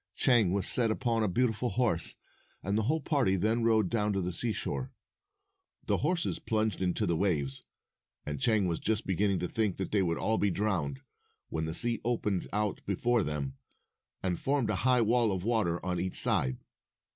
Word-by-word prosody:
Chang 120 -8 +4
was 100 0 0
set 120 -3 +4
upon 115 0 0
a 110 - +2
beautiful 120 +4 0
horse, 115 -10 0 0.5
and 100 +2 -1
the 110 - +2
whole 160 +1 +1
party 135 -10 +1
then 110 +5 +1
rode 110 -3 +3
down 105 0 0
to 95 - 0
the 90 0 -3
seashore. 120 +6 -3 0.9
248 - - -35
The - - +2
horses 175 -2 -1
plunged 110 -3 -1
into 95 +3 0
the 85 -3 +1
waves, 75 -7 -1 0.6
and 75 - -5
Chang 110 -6 +3
was 85 -2 -1
just 110 -1 -1
beginning 95 +1 +1
to 90 - -2
think 105 0 -1
that 95 - -4
they 105 - +2
would 85 -3 0
all 110 0 0
be 100 - +2
drowned, 85 -9 -1 0.5
when 80 0 -2
the 80 +1 -3
sea 120 +2 +3
opened 105 -5 -1
out 105 -1 -1
before 120 +4 +1
them, 70 -3 -4 0.6
and 90 -2 -1
formed 135 -6 0
a 100 - -1
high 125 -1 +4
wall 115 0 +3
of 95 -2 -3
water 105 -7 +1
on 90 -1 -1
each 95 +1 -2
side. 65 -1 +2
105 Hz, 190 wpm, -30 LUFS, 90-115 Hz, 0.9 s, Chang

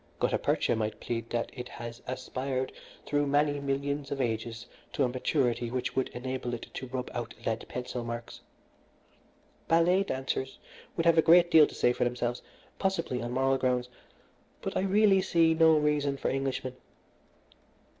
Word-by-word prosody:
Gutta - - +1
percha - - +1
might 110 -1 -2
plead 115 -1 -4
that 120 -1 -2
it 125 -1 -7
has 115 0 -8
aspired 130 +1 -3 0.3
through 145 0 +1
many 145 +1 +2
millions 140 0 -2
of 140 - -2
ages 115 -2 -2 0.3
to 140 - +1
a - - +3
maturity 125 -1 0
which 125 +1 -3
would 130 - +1
enable 125 -1 -4
it 115 - -8
to 130 - -5
rub 125 0 -4
out 120 -1 -5
lead 115 0 -1
pencil 125 -1 -4
marks. 115 0 -6 1.3
Ballet 170 +3 +4
dancers 130 -5 -3 0.4
would 165 - 0
have 165 -1 +5
a - - +8
great 170 +2 +6
deal 155 -3 +8
to - - -11
say 120 - +3
for - - 0
themselves, 120 0 -1 0.4
possibly 170 -10 -1
on 120 +1 -4
moral 135 +1 +2
grounds; 125 -1 0 0.7
but - - -3
I - - +2
really 195 0 +4
see 165 -3 +3
no 160 -1 +5
reason 150 -2 +1
for - - -1
Englishmen. 135 -1 -2
130 Hz, 165 wpm, -29 LUFS, 125-150 Hz, 1.3 s, a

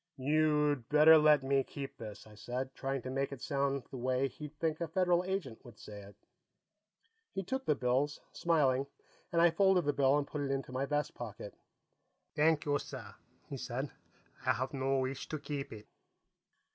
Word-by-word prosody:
"You'd 150 -2 +2
better 150 +2 +8
let 150 -2 +5
me 135 0 +2
keep 135 +1 -7
this," 110 -2 -8
I 110 - -15
said, 125 +5 -5
trying 135 -2 -3
to 130 - -5
make 135 +1 -1
it 140 - -7
sound 140 -1 -1
the 135 - -6
way 130 +2 +1
he'd 150 +1 -10
think 160 0 -1
a 170 - -1
Federal 180 +1 +2
Agent 185 - -4
would 120 -3 -14
say 105 -1 -10
it. 100 +1 -13 1.2
He 195 - -1
took 265 +7 -3
the 150 - +4
bills, 130 +4 0
smiling, 140 -5 +2 0.4
and 170 - +2
I 170 - +6
folded 190 -1 +3
his 145 - +2
bill 135 0 +4
and 145 - 0
put 145 0 -5
it 140 - -2
into 135 -1 -2
my 130 +2 -2
vest 150 0 -1
pocket. 105 -3 -7 0.8
"Thank 150 0 +3
you, 145 -1 +1
sir," - - -8 0.3
he - - -6
said. - - -4 0.5
"I - - +3
have 130 +5 -3
no 135 0 0
wish 130 +1 -3
to 155 - -2
keep 145 -1 -5
it." 110 -1 -10
140 Hz, 185 wpm, -33 LUFS, 130-155 Hz, 1.2 s, better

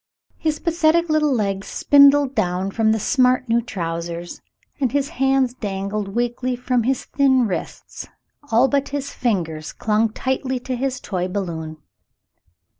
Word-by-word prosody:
His 310 -2 -1
pathetic 335 0 +2
little 305 -1 +2
legs 200 -5 -1
spindled 280 -1 +5
down 185 -2 -1
from 220 +1 +2
the 220 - +1
smart 255 +1 +2
new 230 +1 +2
trousers, 170 -4 -5 0.4
and 260 -4 0
his 285 +1 0
hands 270 -5 +1
dangled 200 -2 -4
weakly 240 +1 -1
from 250 0 0
his 260 +3 -1
thin 265 -3 +2
wrists, 190 -5 -6 0.4
albeit 270 +4 +2
his 280 -1 -4
fingers 165 - -2
clung 220 0 +1
tightly 260 +2 -2
to 255 0 -3
his 260 +1 -2
toy 180 -3 -3
balloon. 165 -5 -4
245 Hz, 135 wpm, -21 LUFS, 195-270 Hz, 0.4 s, spindled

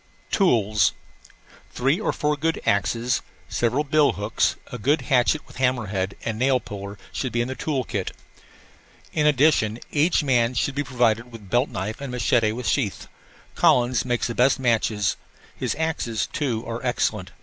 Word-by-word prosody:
TOOLS 110 - +3 0.8
Three 135 +8 +1
or - - 0
four 150 0 0
good 160 +3 -1
axes, 115 +4 +1 0.3
several 120 +5 0
bill 150 0 +3
hooks, 105 +1 0 0.2
a - - -6
good 145 +9 +2
hatchet 135 +2 +2
with - - -15
hammer 125 -3 +1
head 95 0 -2
and 110 -1 -2
nail 130 0 +3
puller 100 -2 -8
should 130 - -3
be 120 - -1
in 120 - 0
the 130 - -3
tool 135 -1 -2
kit. 100 -5 -3 1.0
In 150 -1 +2
addition, 140 -7 +3
each 155 +2 +2
man 125 -3 +2
should 135 +4 0
be 145 +1 -1
provided 120 -2 +1
with 115 -1 -10
a - - -16
belt 120 +8 +1
knife 110 +1 -4
and 140 - -5
a 125 - -4
machete 115 -3 +2
with 120 +2 -4
sheath. 110 -9 -1 0.5
Collins 125 -1 +3
makes 120 -2 -1
the 120 - -2
best 125 +4 +3
machetes. 110 -4 +1 0.4
His - - -2
axes, 120 - -1
too, 125 - -2
are 115 +2 -5
excellent. 110 -6 -1
120 Hz, 170 wpm, -24 LUFS, 110-140 Hz, 1.0 s, TOOLS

